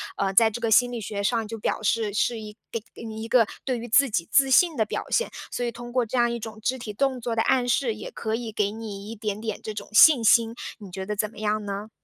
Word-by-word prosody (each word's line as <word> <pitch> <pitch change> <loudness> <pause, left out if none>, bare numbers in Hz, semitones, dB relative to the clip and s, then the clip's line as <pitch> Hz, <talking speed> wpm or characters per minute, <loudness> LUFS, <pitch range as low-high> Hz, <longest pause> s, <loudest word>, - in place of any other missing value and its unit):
啊 195 -1 0
在 220 +3 +6
这 230 - -5
个 230 - 0
心 245 +3 +5
理 235 - -4
学 200 0 -4
上 225 0 0
就 225 - -6
表 220 - -2
示 215 -1 0
是 225 +2 0
一 210 0 -9 0.2
给 230 - -3 0.2
你 220 0 -6
一 - - -5
个 230 -2 +4 0.2
对 255 -2 -1
于 235 +1 -7
自 275 +4 +4
己 170 -6 -1
自 270 -2 +5
信 335 +4 +5
的 220 - +2
表 - - -4
现， 480 - +1 0.2
所 245 - -2
以 240 - -2
通 240 0 -9
过 250 -1 +1
这 250 +3 -3
样 240 0 +3
一 235 - -3
种 220 -1 -8
肢 260 +4 -1
体 235 -4 -6
动 270 +2 0
作 230 0 -2
的 225 - +2
暗 250 0 +2
示， 245 -2 +1
也 215 - -8
可 220 0 -3
以 230 -1 -5
给 210 -1 0
你 210 -2 -7
一 225 - -6
点 210 -1 -4
点 225 - -4
这 215 - -5
种 205 -1 -7
信 270 -1 +7
心， 230 0 +4 0.3
你 195 -3 -11
觉 190 +1 -5
得 210 - -3
怎 210 +1 -1
么 - - -18
样 215 0 -1
呢？ 200 +1 -5
225 Hz, 300 characters per minute, -25 LUFS, 210-240 Hz, 0.3 s, 信